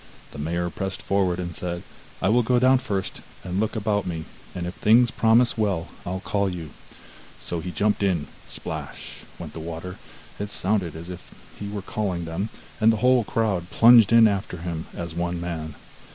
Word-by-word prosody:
The - - -9
mayor 85 +3 -1
pressed 95 +4 -4
forward 95 -3 +1
and 90 -2 -4
said: 85 -1 -4 0.4
'I 95 - +4
will 120 +3 +5
go 125 +1 +2
down 130 +1 +5
first, 100 -7 -3 0.2
and 90 +1 -2
look 110 +2 0
about 105 -2 0
me, 80 -2 -3 0.3
and 90 -1 -3
if 90 - -4
things 115 +4 +5
promise 115 +1 +3
well 95 -6 0 0.2
I'll 95 +1 -3
call 100 -1 0
you.' 85 -4 -6 0.7
So 85 - -4
he 90 +3 -5
jumped 105 +4 +1
in; 90 -7 +1 0.2
splash! - - -6 0.2
went - - -8
the - - -6
water; 85 +3 -6 0.4
it 105 0 -3
sounded 95 -5 0
as 85 +3 -7
if 90 - -11 0.2
he 100 - -4
were 100 -1 -5
calling 95 -5 -2
them, 85 +6 -3 0.3
and 110 0 +6
the 110 - 0
whole 125 -2 +5
crowd 100 -6 0
plunged 115 -1 +7
in 115 -1 +8
after 100 -3 -2
him 80 -1 -4
as 85 -1 -4
one 85 +1 -2
man. 80 -3 -4
95 Hz, 185 wpm, -25 LUFS, 85-110 Hz, 0.7 s, in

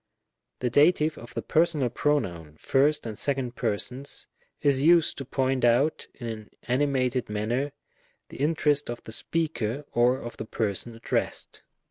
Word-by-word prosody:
The 125 -1 0
Dative 155 +2 +4
of 120 - -12
the - - -2
personal 155 -6 +2
pronoun, 85 - -1
first 145 - +2
and 110 -2 -4
second 135 -4 -1
persons, 125 +5 -2 0.3
is 140 -2 +3
used 165 +1 +5
to 135 - -5
point 130 0 0
out, 120 +6 +3
in 120 - -8
an 110 -2 -6
animated 130 -2 +1
manner, 115 +7 -1 0.6
the - - -10
interest 145 -1 +1
of 120 0 -5
the - - -9
speaker, 145 -2 -2
or 125 +2 +3
of 120 -3 -8
the 110 - -5
person 110 +1 -2
addressed. 115 - -2
130 Hz, 145 wpm, -27 LUFS, 120-145 Hz, 0.6 s, used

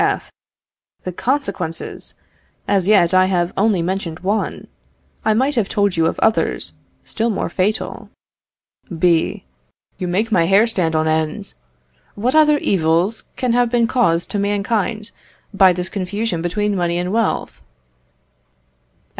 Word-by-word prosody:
F. - - -1 0.7
The 185 - -4
consequences! 185 - -3 0.5
As 195 -2 +1
yet 190 -4 +4
I 185 0 +5
have 175 -2 0
only 200 -3 +2
mentioned 180 -2 -3
one. 200 +4 -2 0.6
I 220 - +2
might 265 +5 +1
have 230 -7 0
told 205 -2 +1
you 165 -1 +2
of - - -2
others 220 - +1 0.3
still 230 +1 -2
more 200 -6 -2
fatal. 200 +5 -2 0.9
B. 170 -1 +1 0.5
Yon 180 - -3
make 210 +6 0
my 170 -6 +3
hair 195 +4 +5
stand 180 -8 -1
on 155 0 +1
end! 160 +5 -1 0.6
What 235 +5 0
other 305 -1 +5
evils 175 - +1
can 250 -2 0
have 245 0 +2
been 235 -1 +2
caused 175 -9 +1
to 205 - -1
mankind 205 +2 -1 0.4
by 195 -2 +6
this 180 0 -3
confusion 200 -1 -3
between 205 +4 -1
money 175 -2 0
and 180 +2 -2
wealth? 230 -1 -1
195 Hz, 140 wpm, -19 LUFS, 175-220 Hz, 0.9 s, by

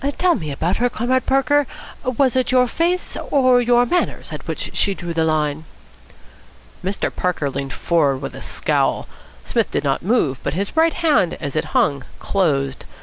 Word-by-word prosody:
Tell 360 -1 +3
me 155 - -4
about 160 +6 -1
her, 245 +1 +2
Comrade 250 +3 0
Parker. 275 +1 +3 0.4
Was 255 0 +1
it 255 -1 +1
your 255 -1 +5
face 345 +8 -1
or 255 -3 +4
your 245 0 +4
manners 355 +9 -1
at - - -8
which - - -4
she 200 - +2
drew 175 -2 -5
the 165 -1 +1
line?" 155 -1 0 1.2
Mr. 195 +2 -2
Parker 160 -6 -1
leaned 140 0 -4
forward 145 -6 +1
with 135 - -5
a - - -9
scowl. - - 0 0.4
Psmith - - 0
did - - -2
not 135 -2 0
move, 165 - +1
but - - -3
his 200 - -3
right 325 0 +3
hand, 305 - +2
as 145 -2 -6
it 155 +1 0
hung, 140 -2 +2
closed. 140 -8 0
195 Hz, 175 wpm, -20 LUFS, -, 1.2 s, your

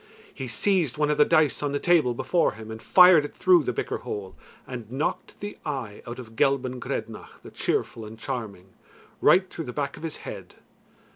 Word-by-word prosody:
He 130 - -6
seized 165 - +1
one 150 0 +2
of 150 - -1
the 150 - +7
dice 155 -4 +3
on 145 -1 -1
the 145 - 0
table 160 -9 +3
before 160 +7 +1
him 110 0 -10
and 110 0 -8
fired 180 -4 +7
it 145 - -7
through 180 -2 +5
the 125 - -1
bicker - - -3
hole, 95 -2 -6 0.3
and 120 -4 -8
knocked 135 +4 -3
the 205 0 -6
eye 130 -9 -5
out 120 - -6
of 115 -3 -10
Gelban 130 0 +1
Grednach 115 -4 -6
the - - -11
Cheerful 115 - -2
and 110 +1 -9
Charming, 105 -7 -6 0.5
right 185 +1 +5
through 165 - -6
the 125 - -6
back 140 -2 -3
of - - -11
his 160 -2 -5
head. - - -8
135 Hz, 200 wpm, -26 LUFS, 115-155 Hz, 0.5 s, the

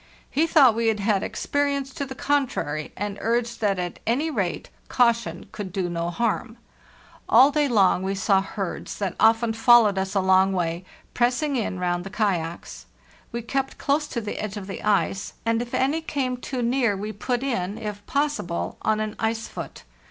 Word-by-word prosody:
He 315 +4 +2
thought 280 -8 +6
we 230 +1 0
had 220 -2 +1
had 200 -1 +1
experience 280 -1 -1
to 280 -4 -4
the 265 - -7
contrary, 255 - -1
and 205 0 -4
urged 235 +1 -1
that 200 -3 +2
at 180 -1 -4
any 285 +8 +1
rate 190 - -2 0.2
caution 235 -2 +1
could 200 -3 -6
dono 175 -3 -2
harm. 230 +4 -2 0.7
All 260 +6 +7
day 295 0 +2
long 200 -7 +3
we 190 +1 -2
saw 195 0 +3
herds, 195 -1 -5
that 195 -4 -2
often 225 0 +4
fol 240 +1 +7
lowed 200 -2 +1
us 190 +1 -3
along 190 0 +4
way, 175 0 -2 0.3
pressing 255 +4 +1
in 220 -6 -1
round 175 -1 -1
the 195 - -7
kayaks. 175 - -2 0.4
We 235 0 -4
kept 270 +3 -2
close 295 +2 0
to 235 - -3
the 210 - -5
edge 215 -1 -4
of 200 - -6
the 195 -1 -6
ice; 200 -2 0
and 230 0 +1
if 240 0 -6
any 290 +5 +1
came 270 -5 -2
too 250 0 -4
near, 235 -4 +1
we 210 +2 -4
put 245 +4 -2
in, 205 -7 -2
if 210 -1 -6
possible, 285 -12 -1
on 215 0 +1
an 215 -1 -3
ice 225 0 -1
foot. - - -8
220 Hz, 180 wpm, -24 LUFS, 195-255 Hz, 0.7 s, All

